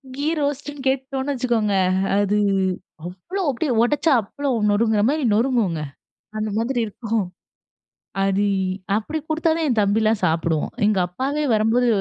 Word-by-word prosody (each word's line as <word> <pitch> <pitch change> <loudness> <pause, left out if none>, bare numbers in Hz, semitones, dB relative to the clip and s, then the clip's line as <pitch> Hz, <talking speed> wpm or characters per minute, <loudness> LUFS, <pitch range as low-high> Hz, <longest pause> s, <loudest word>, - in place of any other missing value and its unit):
Key 285 +2 -3
ரோஸ்ட்னு 285 0 -3
கேட்டுட்டோம்னு 265 +1 -1
வச்சுக்கோங்க, 235 -5 0 0.4
அது 205 +1 +2 0.7
அவ்வளவு 195 - -5
அப்டியே 275 +2 -1
ஒடச்சா 295 +6 +2
அப்பளம் 235 -1 -1
நொருங்குற 220 0 +2
மாதிரி 300 -1 0
நொருங்குங்க. 220 - +1 0.6
அந்த 215 0 -2
மாதிரி 240 +3 0
இருக்கும். 220 0 -2 1.0
அது 195 +1 +1 0.5
அப்டி 305 +9 -3
குடுத்தாதான் 320 0 +1
என் 230 -4 +2
தம்பில்லாம் 215 +1 +2
சாப்பிடுவான். 165 -2 0
எங்க 210 -2 +2
அப்பாவே 275 +11 -2
வரம்போது 225 +3 +2
230 Hz, 120 wpm, -22 LUFS, 210-280 Hz, 1.0 s, அது